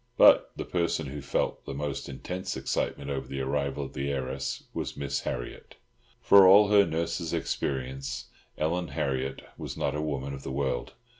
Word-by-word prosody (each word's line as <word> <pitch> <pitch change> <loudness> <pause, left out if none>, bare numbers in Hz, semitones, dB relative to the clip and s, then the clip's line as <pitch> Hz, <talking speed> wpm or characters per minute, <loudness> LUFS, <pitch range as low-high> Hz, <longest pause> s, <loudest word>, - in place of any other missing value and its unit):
But - - +7
the - - -4
person 85 -2 0
who 70 +2 -6
felt 70 - -1
the - - -4
most 70 -1 -3
intense 95 +2 -4
excitement 70 +1 -2
over 70 -1 -3
the 70 - -4
arrival 70 +1 -1
of - - -10
the 70 +1 -2
heiress 65 -1 -3
was - - -4
Miss 70 -1 -1
Harriott. - - -5 0.4
For 100 -5 +8
all 100 +2 +8
her 100 -1 +6
nurse's 85 +1 -1
experience, 65 -4 -3 0.3
Ellen 85 +3 0
Harriott 65 -2 -2 0.2
was - - -6
not 70 - 0
a 75 - -2
woman 70 -3 -3
of 70 - -7
the 70 - -5
world. 65 -3 -2
70 Hz, 170 wpm, -28 LUFS, 65-85 Hz, 0.4 s, For